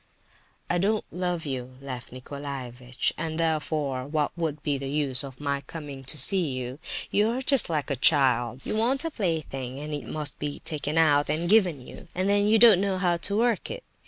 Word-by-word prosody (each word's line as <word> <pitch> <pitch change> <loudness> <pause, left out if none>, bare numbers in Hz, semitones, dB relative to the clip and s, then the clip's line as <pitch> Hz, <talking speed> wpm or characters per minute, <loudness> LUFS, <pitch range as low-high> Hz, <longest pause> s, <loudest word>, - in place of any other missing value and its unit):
"I 175 - 0
don't 210 +3 +1
love 180 -2 -2
you, 130 -2 -5
Lef 130 -3 -7
Nicolaievitch, 130 -2 -4
and, 160 0 -3
therefore, 150 -5 -1
what 150 -1 -1
would 160 -3 -3
be 145 -2 0
the 135 0 -5
use 140 -2 +3
of 135 -2 -9
my 140 -1 -2
coming 145 -2 -8
to 140 - -5
see 180 +5 +4
you? 130 +2 -5 0.3
You 210 +2 +3
are 245 +3 -2
just 265 -7 +5
like 150 -4 -2
a - - +1
child—you 130 - +2
want 250 +7 +1
a 330 - -2
plaything, 155 - -3
and 150 +1 -6
it 145 - -5
must 150 -2 -1
be 145 -1 -3
taken 150 0 -3
out 145 -3 +4
and 160 +3 0
given 180 - +3
you—and 185 +2 -5
then 205 0 +3
you 220 +1 +5
don't 220 -5 +7
know 195 -1 0
how 175 -2 +1
to 200 +4 +1
work 235 -2 +1
it. - - -6
150 Hz, 190 wpm, -26 LUFS, 135-185 Hz, 0.3 s, don't